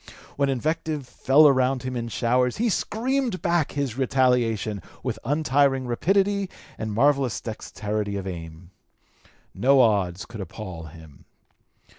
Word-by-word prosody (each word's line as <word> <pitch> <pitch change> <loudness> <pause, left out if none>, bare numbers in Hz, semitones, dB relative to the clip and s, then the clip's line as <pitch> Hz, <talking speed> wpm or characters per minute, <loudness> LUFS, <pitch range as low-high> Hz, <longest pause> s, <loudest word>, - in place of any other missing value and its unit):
When 140 -1 +1
invective 150 +1 -2
fell 145 +5 +5
around 130 -1 +2
him 130 0 -4
in 120 -1 -3
showers, 125 +2 +1
he 235 +1 +1
screamed 240 +1 -1
back 170 -5 +1
his 135 -3 -2
retaliation 120 -6 +1 0.2
with 115 -4 -3
untiring 140 -1 +2
rapidity 195 +10 +1 0.3
and 110 -1 -4
marvellous 130 -3 +2
dexterity 105 -2 -4
of 95 - -5
aim. 85 -1 -8 0.8
No 135 +2 +4
odds 100 -7 +2
could 115 -3 -8
appall 90 -3 -7
him. 80 -2 -14
125 Hz, 125 wpm, -25 LUFS, 105-145 Hz, 0.8 s, fell